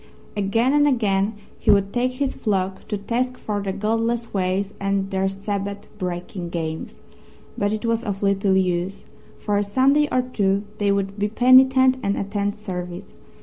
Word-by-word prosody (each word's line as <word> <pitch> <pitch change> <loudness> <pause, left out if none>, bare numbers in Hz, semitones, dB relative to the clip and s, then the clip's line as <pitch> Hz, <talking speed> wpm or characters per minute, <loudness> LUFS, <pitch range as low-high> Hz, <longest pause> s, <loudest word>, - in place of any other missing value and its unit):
Again 225 +6 +1
and 295 0 +4
again 210 -5 +1 0.2
he - - -2
would 200 0 +4
take 250 +1 +1
his 270 +1 -1
flock 190 -3 -2
to 210 - -2
task 250 +5 -2
for 205 -1 -3
their 195 -1 -2
godless 225 +3 -1
ways 190 +1 -1
and 195 0 -1
their 190 0 +1
Sabbath 200 +1 -4
breaking 180 0 -4
games. 160 -2 -5 0.5
But 205 0 0
it 215 +1 -3
was 230 0 0
of 200 -1 -3
little 195 -1 +2
use. 180 +1 -1 0.3
For 205 -1 -1
a - - +1
Sunday 270 +8 +3
or 255 0 +2
two 200 -5 0 0.2
they 205 -1 +2
would 200 0 -1
be 205 - +1
penitent 260 +2 +5
and 200 -3 0
attend 200 0 -2
service. 180 -2 -6
200 Hz, 165 wpm, -23 LUFS, 195-230 Hz, 0.5 s, penitent